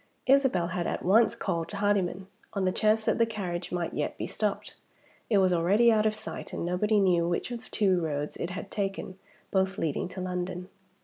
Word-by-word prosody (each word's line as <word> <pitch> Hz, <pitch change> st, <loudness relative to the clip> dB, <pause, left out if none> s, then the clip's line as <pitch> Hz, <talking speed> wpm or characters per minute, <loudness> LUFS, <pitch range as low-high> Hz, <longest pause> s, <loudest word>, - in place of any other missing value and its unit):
Isabel 260 Hz, -11 st, +3 dB
had 175 Hz, -1 st, -2 dB
at -, -, -3 dB
once 225 Hz, +5 st, +4 dB
called 165 Hz, -7 st, -2 dB
Hardyman, 200 Hz, -2 st, 0 dB, 0.3 s
on 195 Hz, -2 st, 0 dB
the 185 Hz, -, +2 dB
chance 215 Hz, +2 st, +2 dB
that -, -, +1 dB
the 230 Hz, -, +5 dB
carriage 180 Hz, -6 st, -4 dB
might 175 Hz, -2 st, -2 dB
yet -, -, -2 dB
be -, -, -3 dB
stopped. -, -, -2 dB, 0.6 s
It 210 Hz, -, +4 dB
was 185 Hz, -2 st, +4 dB
already 200 Hz, +8 st, +4 dB
out 215 Hz, -1 st, +3 dB
of 215 Hz, -, 0 dB
sight, 215 Hz, -, -7 dB
and -, -, -3 dB
nobody 205 Hz, +5 st, +2 dB
knew 175 Hz, -3 st, +3 dB
which 175 Hz, +7 st, -2 dB
of 230 Hz, -2 st, -7 dB
two 190 Hz, -4 st, +2 dB
roads 150 Hz, -2 st, -3 dB
it 170 Hz, -, -3 dB
had 185 Hz, +2 st, -7 dB
taken, 195 Hz, -2 st, -3 dB, 0.3 s
both 190 Hz, 0 st, +1 dB
leading 155 Hz, -1 st, -1 dB
to 185 Hz, -, -8 dB
London. 180 Hz, 0 st, -4 dB
190 Hz, 195 wpm, -28 LUFS, 175-215 Hz, 0.6 s, the